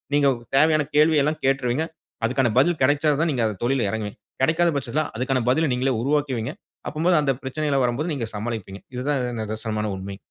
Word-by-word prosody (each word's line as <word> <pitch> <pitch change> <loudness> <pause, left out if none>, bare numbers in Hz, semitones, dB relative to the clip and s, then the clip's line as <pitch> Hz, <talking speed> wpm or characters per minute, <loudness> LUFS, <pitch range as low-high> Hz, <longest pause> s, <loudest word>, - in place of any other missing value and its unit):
நீங்க 145 -1 +4 0.3
தேவையான 155 0 +4
கேள்வி 155 0 +5
எல்லாம் 155 +1 -1
கேட்றுவீங்க. 135 +2 +1 0.4
அதுக்கான 125 +1 +2
பதில் 165 +4 +2
கிடைச்சால் 145 +2 +3
தான் 165 - +1
நீங்க 130 -4 -1
அந்த 105 -3 -4
தொழில்ல 125 -4 +1
இறங்குவீங்க. 105 0 -4 0.2
கிடைக்காத 165 +5 +3
பட்சத்தில 140 +2 -1
அதுக்கான 130 +3 0
பதிலை 160 +5 +3
நீங்களே 130 +2 +1
உருவாக்குவீங்க. 135 -3 0 0.4
அப்பம்போது 165 +2 +2
அந்த 140 -2 +2
பிரச்சனைலாம் 140 0 0
வரும்போது 140 +8 -1
நீங்க 125 -6 -3
சமாளிப்பீங்க. 105 -3 -5
இது 125 - -3
தான் 145 -2 +1
இது 125 0 -2
நிதர்சனமான 110 0 -3
உண்மை. 95 +1 -7
135 Hz, 175 wpm, -23 LUFS, 115-150 Hz, 0.4 s, கேள்வி